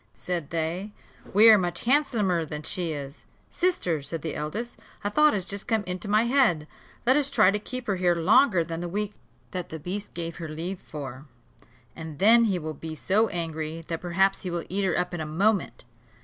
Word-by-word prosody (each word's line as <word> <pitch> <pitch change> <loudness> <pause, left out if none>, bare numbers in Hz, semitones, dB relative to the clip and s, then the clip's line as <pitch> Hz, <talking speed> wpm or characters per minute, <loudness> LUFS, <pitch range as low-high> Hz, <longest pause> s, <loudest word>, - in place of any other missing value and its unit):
said 175 -5 -4
they. 170 +5 -2 0.4
"We 210 +4 +7
are 215 - +7
much 175 -1 -2
handsomer 230 - +2
than 150 -1 -6
she 175 +1 -1
is." 140 -1 -7 0.3
"Sister," 185 - 0
said 150 +2 -6
the 160 - -3
eldest, 205 +11 -4 0.3
"a 205 - -1
thought 300 +4 +4
has 190 -3 -2
just 200 0 -4
come 220 -2 +1
into 180 +1 -5
my 210 +2 +3
head: 235 - +3 0.4
let 260 +2 +5
us 285 -1 +1
try 220 -9 +5
to 210 - -1
keep 255 +3 -6
her 200 -4 0
here 180 -1 +2
longer 185 +2 +4
than 165 +1 -5
the 175 - -4
week 205 +3 -2 0.4
that 180 -2 -5
the 160 - -6
beast 190 +6 -6
gave 170 -1 -4
her 165 -3 -6
leave 170 +5 -4
for: 135 -2 -8 0.7
and 160 -2 -8
then 230 +6 +6
he 195 -4 +1
will 155 -2 -4
be 160 +2 -7
so 210 +7 +2
angry, 160 -2 -4
that 165 -1 -3
perhaps 190 +2 +1
he 185 - -4
will 170 -1 -3
eat 195 +2 0
her 185 - +1
up 180 0 -1
in 175 - -3
a - - -3
moment." 195 +6 0
180 Hz, 205 wpm, -26 LUFS, 160-210 Hz, 0.7 s, We